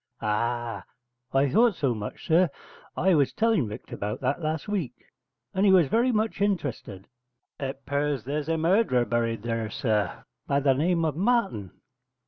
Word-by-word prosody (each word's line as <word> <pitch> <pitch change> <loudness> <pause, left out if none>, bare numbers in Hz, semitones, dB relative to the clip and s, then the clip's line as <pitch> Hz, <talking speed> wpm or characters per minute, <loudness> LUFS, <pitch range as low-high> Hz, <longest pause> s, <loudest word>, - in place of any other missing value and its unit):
'Ah, 115 -1 -2 0.5
I 135 +1 +3
thought 225 - +4
so 135 -6 0
much, 105 -2 -7
sir. 170 +2 +4 0.5
I 190 +2 +3
was 145 -4 +2
tell'n 220 - +2
Rector 105 +3 -8
'bout 105 +1 -3
that 135 +5 -1
last 155 0 -2
week, 175 - -2 0.6
and 190 - +1
he 200 - +6
was 175 -7 +5
very 240 +3 +3
much 215 -2 -1
interested. 140 - -2 0.5
It 135 0 -5
'pears 140 -3 -1
there's 145 +4 -3
a 165 - +1
murderer 165 - +2
buried 115 -1 -1
there, 115 -2 -2
sir, 105 -3 -1 0.2
by 140 - +2
the 140 -1 +3
name 165 +4 +1
of 155 -3 -1
Martin. 190 - 0
140 Hz, 160 wpm, -26 LUFS, 120-185 Hz, 0.6 s, he